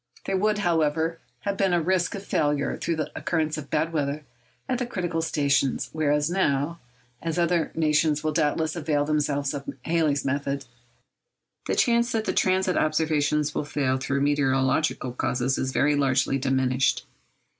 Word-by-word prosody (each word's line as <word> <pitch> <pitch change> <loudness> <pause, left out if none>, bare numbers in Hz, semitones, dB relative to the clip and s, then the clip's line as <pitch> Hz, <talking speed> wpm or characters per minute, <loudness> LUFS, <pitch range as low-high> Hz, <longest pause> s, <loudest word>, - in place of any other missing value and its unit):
There 195 - -1
would, 210 +2 +2
however, 165 -3 +1 0.2
have 200 +5 -2
been 195 -2 +2
a 175 - +3
risk 180 +3 0
of 200 0 -7
failure 145 -4 0
through 170 - -2
the 155 -1 -3
occurrence 155 -2 -1
of 150 -2 -7
bad 160 +2 0
weather 145 -1 -2 0.4
at 255 -2 -1
the 245 - -2
critical 175 -7 -2
stations; 140 -4 0
whereas 150 -1 +1
now—as 140 -4 -3
other 170 -1 +1
nations 155 -1 +2
will 155 - +1
doubtless 155 +1 0
avail 150 -3 0
themselves 145 -1 0
of 140 -1 -5
Halley's 160 -4 +1
method—the 130 -3 -6
chance 235 -1 +2
that 220 -1 0
the - - 0
transit 185 0 +2
observations 150 -1 +1
will - - -1
fail 140 -3 0
through 135 +1 -1
meteorological 135 -1 +1
causes 125 +1 -1
is 130 - -1
very 145 +3 +2
largely 135 -1 +1
diminished. 130 -1 +1
150 Hz, 150 wpm, -25 LUFS, 140-165 Hz, 0.4 s, a